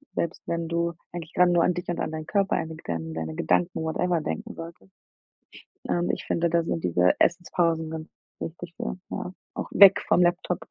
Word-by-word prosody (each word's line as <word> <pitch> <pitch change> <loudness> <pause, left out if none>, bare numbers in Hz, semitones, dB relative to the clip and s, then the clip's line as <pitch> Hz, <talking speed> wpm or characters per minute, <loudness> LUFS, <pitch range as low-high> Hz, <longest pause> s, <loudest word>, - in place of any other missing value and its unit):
selbst 170 - -2
wenn 170 -1 -2
du 170 0 0 0.2
eigentlich 170 -1 -7
gerade 180 0 +5
nur 170 -1 +4
an - - +3
dich 175 0 -5
und 175 - -2
an - - -1
deinen 155 0 -5
Körper, 200 -2 +1
an 160 - -3
deine 160 - -8
Gedan 85 - -3
an - - -6
deine 80 -1 -4
Gedanken, 165 - +1
whatever, 170 +2 0
denken 225 +8 -4
solltest. 165 - -10 1.0
Ähm, 175 0 +1
ich - - -5
finde, 170 0 +1
da 170 0 +2
sind 165 0 -2
diese 90 +1 +3
Essenspausen 170 -2 +1
ganz 160 0 -6 0.3
wichtig 170 +1 -7
für. - - -4
Ja, 180 - -4 0.2
auch - - -4
weg 200 -1 +8
vom 180 - +4
Laptop. 175 0 +1
170 Hz, 200 wpm, -26 LUFS, 160-175 Hz, 1.0 s, weg